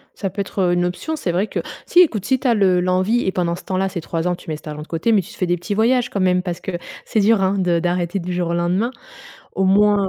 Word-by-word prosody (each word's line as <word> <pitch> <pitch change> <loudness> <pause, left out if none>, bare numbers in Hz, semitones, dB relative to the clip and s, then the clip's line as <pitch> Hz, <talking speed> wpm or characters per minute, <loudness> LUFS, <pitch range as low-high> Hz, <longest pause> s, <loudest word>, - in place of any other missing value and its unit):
Ça 195 - -3
peut 195 - -5
être, 195 - -10
heu, 175 - +2
une 175 - +1
option, 180 - -3
c'est 185 - -2
vrai 185 +5 +1
que - - -3 0.3
si 350 - +5
écoute, 225 - +3
si 260 0 +2
tu 265 - -4
as 245 - +4
le 190 -4 +3
l'envie 185 +6 +1
et 190 - +1
pendant 170 -2 -1
ce - - -11
temps-là 190 0 0
ces 180 -2 -5
3 165 +1 -3
ans, 180 - +1
tu 170 - -9
mets 155 - -2
cet 150 - -17
argent 150 0 -6
de 150 - -10
côté 165 +8 -1
mais 205 - +4
tu - - -13
te - - -14
fais 185 - 0
des 175 0 +1
petits 190 +4 -4
voyages 240 +3 +2
quand 200 - -2
même 180 -1 +2
parce 175 -2 -4
que, 190 - -5 0.3
c'est 220 - +1
dur, 215 +1 +4
hein, 190 +1 +2
de 175 -2 +2
d'arrêter 175 +2 -1
du 180 0 -4
jour 175 -1 -1
au 170 - -1
lendemain! 180 +7 0 0.7
Au 190 - +2
moins 200 +1 +4
185 Hz, 305 wpm, -20 LUFS, 175-205 Hz, 0.7 s, si